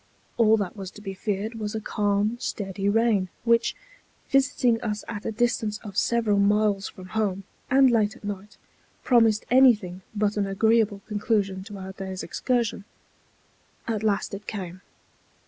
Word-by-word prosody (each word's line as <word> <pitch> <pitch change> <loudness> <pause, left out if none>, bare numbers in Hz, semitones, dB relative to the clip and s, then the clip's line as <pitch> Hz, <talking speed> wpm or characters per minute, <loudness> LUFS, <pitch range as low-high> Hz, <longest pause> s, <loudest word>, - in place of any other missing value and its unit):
All 220 -1 +5
that 200 -4 -3
was 195 -3 -6
to - - -11
be 195 -2 -5
feared 205 +3 -3
was 210 0 -4
a - - -1
calm, 205 +1 0
steady 195 -2 -2
rain, 215 -3 +2
which, 235 0 +2 0.6
visiting 255 -4 +2
us 210 -2 -3
at 210 -3 -5
a - - -1
distance 220 -2 0
of 205 -4 -9
several 225 -2 +2
miles 205 0 +2
from 185 0 -12
home, 195 -2 -1 0.3
and 265 -1 +5
late 220 -1 +2
at - - -18
night, 205 0 -6 0.5
promised 225 -4 +4
any 255 -1 +7
thing 185 -3 -9
but 210 0 0
an 200 -1 +1
agreeable 215 0 +2
conclusion 205 -3 -1
to 205 -2 -9
our 190 0 -7
day's 190 0 -6
excursion. 235 -5 -1 1.0
At 220 -3 -1
last 210 -1 0
it 200 +1 -7
came. 185 -3 -6
210 Hz, 160 wpm, -25 LUFS, 200-225 Hz, 1.0 s, any